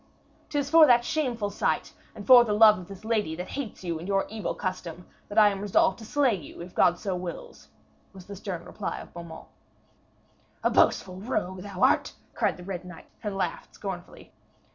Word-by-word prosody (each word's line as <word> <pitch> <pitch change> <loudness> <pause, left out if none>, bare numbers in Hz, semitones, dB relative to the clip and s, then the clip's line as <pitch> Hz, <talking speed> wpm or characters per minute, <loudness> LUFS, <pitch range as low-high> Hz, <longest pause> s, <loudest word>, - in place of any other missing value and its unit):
''Tis 285 -1 -2
for 320 -1 +8
that 240 -2 +5
shameful 240 -9 -1
sight - - -1 0.2
and - - -9
for 250 -2 +9
the 215 -3 -1
love 215 -1 +7
of 180 - -10
this 195 +1 -11
lady 215 -8 0
that 180 +2 -6
hates 260 -9 -6
you 170 -3 -3
and 170 - -8
your 195 -1 +1
evil 220 -1 -4
custom, 180 -2 -5 0.2
that 205 - -7
I 210 -1 +8
am 195 -1 -4
resolved 195 -1 +2
to 220 - -10
slay 275 0 +2
you, 170 -8 -8
if 175 +1 -9
God 175 -1 +3
so 190 -1 -3
wills,' 185 - -8 0.4
was 190 -2 -13
the 200 - -8
stern 190 -3 -6
reply - - -5
of - - -12
Beaumains. 170 -2 -9 1.2
'A - - +2
boastful 185 -1 +2
rogue 190 -3 -3
thou 200 -2 -4
art,' - - +3 0.2
cried - - 0
the 180 - -10
Red 180 -1 -5
Knight, 180 -2 -12
and 205 -2 -4
laughed - - -4
scornfully. - - -8
200 Hz, 195 wpm, -27 LUFS, 180-225 Hz, 1.2 s, for